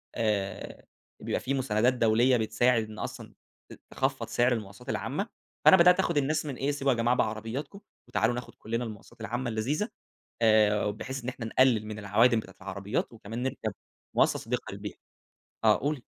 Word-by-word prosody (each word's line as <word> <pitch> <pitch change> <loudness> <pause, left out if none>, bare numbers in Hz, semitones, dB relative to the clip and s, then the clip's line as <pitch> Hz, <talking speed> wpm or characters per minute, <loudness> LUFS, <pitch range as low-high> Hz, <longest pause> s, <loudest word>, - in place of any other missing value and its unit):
آآ 105 -3 -2 0.4
بيبقى - - -1
في 130 - -1
مساندات 125 -2 +2
دولية 120 +2 +4
بتساعد 115 +2 +2
إن 110 - -9
أصلًا - - -6 0.4
ت - - -11
تخفّض 130 -3 -1
سِعر 120 +2 +2
المواصلات 100 -4 -6
العامة. - - -2 0.4
فأنا 190 - +9
بدأت 180 +1 +6
آخُد 170 -4 +1
الناس 155 +2 +1
من 140 -4 -4
إيه، 140 +3 0
سيبوا 140 -1 +1
يا - - -4
جماعة 120 +2 +2
بعربياتكم، 115 - -3 0.3
وتعالوا 115 +2 +1
ناخُد 125 - -7
كلّنا 115 +2 -3
المواصات 105 -3 -10
العامة 120 +2 -2
اللذيذة. 135 - -1 0.5
آآ، 110 -2 +4
وبحيث 125 +5 -4
إن 125 - -2
احنا 120 -2 -6
نقلّل 115 -1 +3
من 110 0 -6
العوادم 110 +4 +4
بتاعة - - -10
العربيات، 100 +3 -3
وكمان 115 +2 -6
نِركب 125 -5 -3 0.4
مواصلة - - +3
صديقة - - -3
للبيئة. - - -7 0.7
آه - - +6
قولي. 145 0 -1
120 Hz, 165 wpm, -29 LUFS, 110-130 Hz, 0.7 s, فأنا